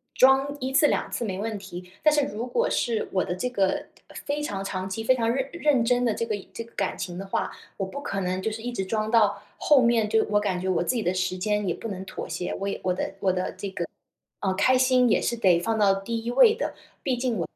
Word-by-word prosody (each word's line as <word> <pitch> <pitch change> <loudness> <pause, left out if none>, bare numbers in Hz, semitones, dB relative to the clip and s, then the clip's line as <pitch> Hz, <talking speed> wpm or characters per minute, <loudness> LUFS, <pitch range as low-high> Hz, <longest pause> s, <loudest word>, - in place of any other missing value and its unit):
装 270 +2 +5
1 260 +1 -2
次 290 +2 +5
2 - - -1
次 235 - -2
没 190 -3 -3
问 215 0 -3
题， 180 -2 -9
但 305 - +5
是 295 -1 +3
如 230 0 -4
果 475 - +1
是 230 -2 0
我 185 -2 +1
的 180 - -3
这 250 +7 -2
个 195 -6 0 0.4
非 290 +1 -1
常 200 -9 -3
长 190 -1 -4
期、 225 +4 -4
非 260 - +5
常 230 -3 0
认 265 +2 0
认 295 -8 +2
真 245 +1 +2
的 230 - +2
这 230 - -2
个 220 - -2 0.2
这 230 - -5
个 230 - -19
感 195 - -1
情 175 -1 -5
的 195 - -5
话， - - -1 0.2
我 195 - -2
不 235 +9 -6
可 195 -8 -3
能 185 +1 -1
就 220 - -1
是 220 +1 -6
一 245 +1 -3
直 195 -5 -3
装 215 +2 -1
到 205 -3 +3 0.2
后 290 -4 +5
面， 230 -3 +3
就 220 0 +3
我 205 0 +3
感 190 -3 -1
觉 185 - -3
我 185 -1 +1
自 250 - 0
己 225 - 0
的 180 - +1
时 185 0 -1
间 210 +1 0
也 175 - +1
不 230 - -7
能 190 -2 -5
妥 - - -7
协， 180 - -3
我 200 - -2
也 200 - -3
我 180 - +1
的 185 - -3
我 190 -1 +2
的 185 0 -2
这 195 +2 -5
个， 180 -2 -3 0.6
呃， 190 -2 +1
开 255 +6 +4
心 255 -1 +4
也 - - +3
是 235 - 0
得 185 -6 +4
放 225 +5 -1
到 200 -2 +5
第 225 +4 -3
1 235 - -1
位 445 - +6
的， - - -3 0.3
毕 255 - 0
竟 245 -3 -1
我 - - -2
215 Hz, 280 characters per minute, -26 LUFS, 190-245 Hz, 0.6 s, 位